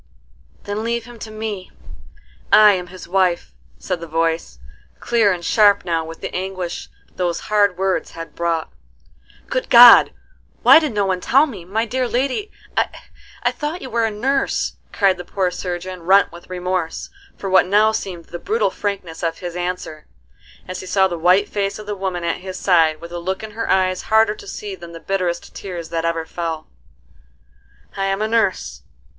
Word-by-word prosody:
"Then 205 +2 -4
leave 235 0 -2
him 240 -1 -12
to 220 - -7
me: 215 -3 -5 0.8
I 215 -1 +8
am 180 -2 -3
his 185 0 -11
wife," 180 -2 +1 0.3
said 180 -2 -3
the 170 - -8
voice, 165 - -1 0.4
clear 225 -4 +2
and 175 -2 -3
sharp 205 -3 +4
now 165 -2 0
with 165 +1 -10
the - - -5
anguish 185 -2 -4 0.3
those 175 -2 -1
hard 205 -3 +3
words 190 0 0
had 165 0 -8
brought. 170 -1 -2 0.7
"Good - - -3
God, 240 -1 +9 0.5
why - - +9
did 305 -6 -2
no 205 -1 +2
one 185 -1 -1
tell 275 +9 +4
me! 205 - -9
My 220 +5 -1
dear 255 +2 -1
lady, 270 - -1 0.9
I - - +2
thought 310 +4 -5
you 260 - -7
were 230 0 +1
a - - +1
nurse!" 265 +6 -1
cried 195 -3 +2
the - - -5
poor 185 +1 -1
surgeon 180 0 -5
rent 195 +4 +4
with 170 +2 -13
remorse 180 -2 -3 0.3
for 195 - -5
what 185 -1 +4
now 210 +3 +4
seemed 180 -6 -5
the 175 - -8
brutal 445 +3 0
frankness 195 -5 -4
of 165 -1 -1
his 175 -1 -6
answer, 180 -3 -4 0.6
as 185 0 -5
he 185 - -8
saw 190 +1 +3
the 175 -3 -5
white 185 +5 +4
face 200 -1 -2
of 215 - -9
the 205 0 -4
woman 190 -3 -3
at 170 - -1
his 185 0 -7
side, 160 -4 +3
with 170 0 -9
a 175 - -4
look 190 +4 -3
in 215 - -7
her 225 +2 -4
eyes 185 -1 +2
harder 220 -1 +4
to 210 - -13
see 205 +1 -6
than 170 -2 -10
the 165 - -8
bitterest 180 -2 -2
tears 175 -4 -7
that 165 0 -2
ever 165 -1 -1
fell. 160 -2 -4 1.3
"I 195 - -1
am 195 +2 0
a - - 0
nurse. 185 - 0
190 Hz, 185 wpm, -20 LUFS, 175-215 Hz, 1.3 s, God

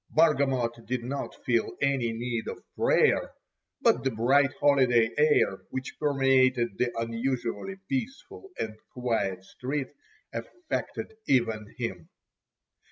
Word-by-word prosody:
Bargamot 135 -7 +2
did 125 -1 -2
not 135 +3 -4
feel 120 -2 +1
any 135 -4 +1
need 115 0 -3
of - - -6
prayer, - - +3 0.5
but 125 - +3
the 135 - +2
bright 130 +5 +3
holiday 125 -5 +4
air 150 -10 +3
which 130 -1 -5
permeated 130 -5 +3
the 125 -1 +2
unusually 115 - -2
peaceful 270 - -4
and 110 -1 -3 0.2
quiet 105 -7 -1
street 130 +6 -4 0.4
affected 355 +5 -4
even 110 -4 +1
him. 95 -9 -4
125 Hz, 110 wpm, -28 LUFS, 115-140 Hz, 0.5 s, holiday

